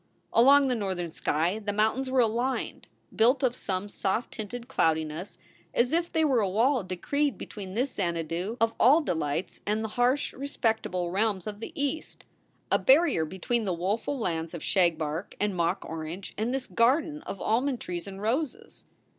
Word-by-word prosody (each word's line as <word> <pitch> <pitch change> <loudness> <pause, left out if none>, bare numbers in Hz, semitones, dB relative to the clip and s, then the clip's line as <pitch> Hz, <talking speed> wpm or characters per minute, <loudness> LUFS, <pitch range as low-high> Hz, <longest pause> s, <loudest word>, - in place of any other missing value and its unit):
Along 275 +4 +6
the 255 - +1
northern 190 -7 -2
sky 165 +7 0
the 205 -1 -3
mountains 220 +6 +1
were 260 -1 +4
aligned, 240 +3 -1 0.3
built 250 +5 +4
of 250 -2 +2
some 190 -2 -3
soft 205 +3 -2
tinted 235 +2 -6
cloudiness 160 - -1 0.4
as 245 +4 +2
if 340 +1 +1
they 320 -1 +2
were 265 -5 +3
a 200 -3 +1
wall 235 +5 +2
decreed 240 - -1
between 195 -2 -8
this 255 +3 0
Xanadu 170 +3 -2
of 230 0 +2
all 285 +8 +6
delights 160 - -2
and 215 +2 -1
the 220 - -3
harsh, 255 +4 +2
respectable 220 -10 -1
realms 200 -1 0
of 210 -1 -6
the 225 - -6
East, 285 +3 -3 0.5
a - - +4
barrier 275 - +4
between 200 +7 -2
the 185 -3 0
woeful 205 +10 -1
lands 165 -7 -2
of 165 - -7
shagbark 165 -1 0
and 205 -2 0
mock 175 +2 0
orange 165 +4 -6
and 220 +3 -1
this 265 0 -2
garden 295 +7 +2
of 195 - -5
almond 250 +3 +1
trees 175 -1 -5
and 195 +1 -8
roses. 305 - -2
215 Hz, 170 wpm, -28 LUFS, 180-255 Hz, 0.5 s, Along